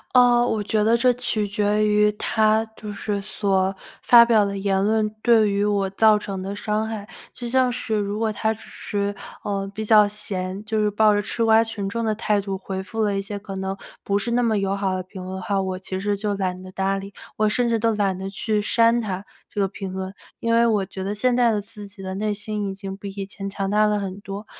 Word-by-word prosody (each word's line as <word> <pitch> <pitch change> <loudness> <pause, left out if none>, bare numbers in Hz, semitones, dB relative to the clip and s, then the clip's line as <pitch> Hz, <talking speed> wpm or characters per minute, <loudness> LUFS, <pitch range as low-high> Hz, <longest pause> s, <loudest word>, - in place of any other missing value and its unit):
呃， 245 -1 +6
我 215 -1 0
觉 210 +1 +1
得 225 +2 +4
这 250 +1 +4
取 225 -4 -1
决 210 +1 +1
于 210 0 +4
他 215 +1 +2
就 210 -1 -7
是 205 0 -3
所 195 -1 0 0.3
发 235 -1 +9
表 220 -3 +4
的 200 0 -3
言 195 -1 +1
论 215 0 +2
对 225 -3 +5
于 200 +1 +1
我 200 -2 +1
造 215 +2 +4
成 195 -2 -5
的 200 +1 -4
伤 215 +1 -1
害， 215 -1 -6 0.2
就 240 - -6
像 255 0 +3
是 235 -2 -2
如 205 0 -1
果 220 -1 +1
他 220 +1 0
只 220 - -15
是， 200 0 -3 0.3
呃， 195 -1 -2
比 220 - -4
较 210 -1 +6
闲， 195 -2 -5
就 220 +1 -1
是 210 - +1
抱 210 0 +4
着 205 - +1
吃 230 - -2
瓜 225 0 +5
群 210 -3 -4
众 230 +2 -2
的 215 - +1
态 210 -1 +1
度 195 -1 -4
回 190 0 -5
复 225 +3 -4
了 205 -2 +1
一 195 - -2
些 205 0 -6
可 195 -1 -8
能 190 0 -3 0.3
不 200 0 +1
是 205 - -3
那 245 0 +2
么 220 -3 +2
友 195 0 0
好 195 -1 -1
的 185 - -2
评 185 0 -9
论 185 +1 -6
的 190 - -5
话， 200 +1 0
我 185 -1 -2
其 190 0 -5
实 205 +1 0
就 205 0 -2
懒 185 -1 -2
得 185 0 -10
搭 195 +1 0
理， 195 +1 -8 0.3
我 215 0 +3
甚 240 +2 +1
至 230 -1 +1
都 225 -1 +1
懒 195 -2 +1
得 190 +1 -5
去 210 +1 -1
删 230 +2 +3
他 195 -2 -4 0.2
这 205 - -5
个 195 - +3
评 190 -1 -6
论。 190 0 -5 0.3
因 230 0 0
为 235 0 +5
我 210 -4 +1
觉 190 +1 -7
得 200 +2 -2
现 245 +3 +2
在 240 -2 +4
的 210 - 0
自 210 0 -9
己 200 -1 -12
的 190 0 -4
内 210 +2 -1
心 210 0 -3
已 195 - -5
经 195 -1 -6
比 200 0 -7
以 195 0 -5
前 195 0 -6
强 195 0 -3
大 210 0 +4
了 210 0 +1
很 195 0 -5
多。 200 +1 -7
205 Hz, 270 characters per minute, -23 LUFS, 195-220 Hz, 0.3 s, 发